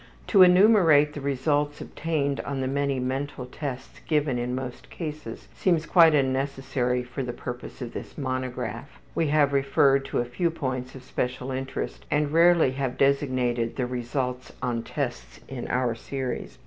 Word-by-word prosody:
To 200 - +6
enumerate 180 -6 +6
the 145 - -6
results 145 +2 0
obtained 145 -3 -2
on 140 -1 -3
the 130 - -1
many 140 0 0
mental 130 +1 -3
tests 135 +1 -7
given 150 -5 +1
in 125 +1 -2
most 125 -1 -6
cases 150 -8 -7
seems 170 -4 +1
quite 165 -1 +6
unnecessary 135 -2 0
for 125 +2 -6
the 125 -2 -3
purpose 125 +1 -7
of 120 - -7
this - - -8
monograph. 130 -2 -4
We 165 - +1
have 145 -1 +3
referred 135 0 +3
to 140 - -3
a 120 - +1
few 170 +8 0
points 130 -5 -4
of 130 - -10
special 125 +1 -3
interest 130 0 -4
and 145 0 +1
rarely 170 -4 +5
have 130 -1 -3
designated 130 -4 +1
the 130 - -1
results 125 +1 -3
on 120 -2 -1
tests - - -5
in 125 -2 -6
our 125 -2 +1
series. 130 +2 -5
135 Hz, 160 wpm, -26 LUFS, 125-145 Hz, -, To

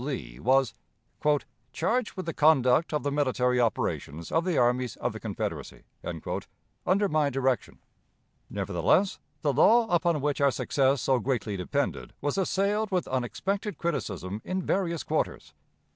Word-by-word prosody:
Lee 65 - -5
was 130 - +3 1.0
"charged 245 -1 0
with 185 - -4
the 165 - -3
conduct 150 -1 +4
of 150 - -1
the 145 - 0
military 125 -3 +2
operations 85 -8 -2
of 165 +1 +1
the 180 -4 0
armies 125 0 +2
of - - -2
the - - -7
Confederacy" - - -5 1.0
under 200 +2 +2
my 155 -4 +2
direction. 135 -2 -1 0.7
Nevertheless, 130 - +1 0.2
the 145 -2 +2
law 225 - +5
upon 170 -2 +2
which 145 -1 -1
our 140 - +5
success 135 -1 +1
so 130 -2 +3
greatly 115 -4 -1
depended 140 +10 -2
was 145 +6 -1
assailed 200 +3 +1
with 185 -3 0
unexpected 195 - -2
criticism 105 - -3
in 185 0 -2
various 170 -4 0
quarters. - - -2
145 Hz, 140 wpm, -28 LUFS, 125-175 Hz, 1.0 s, law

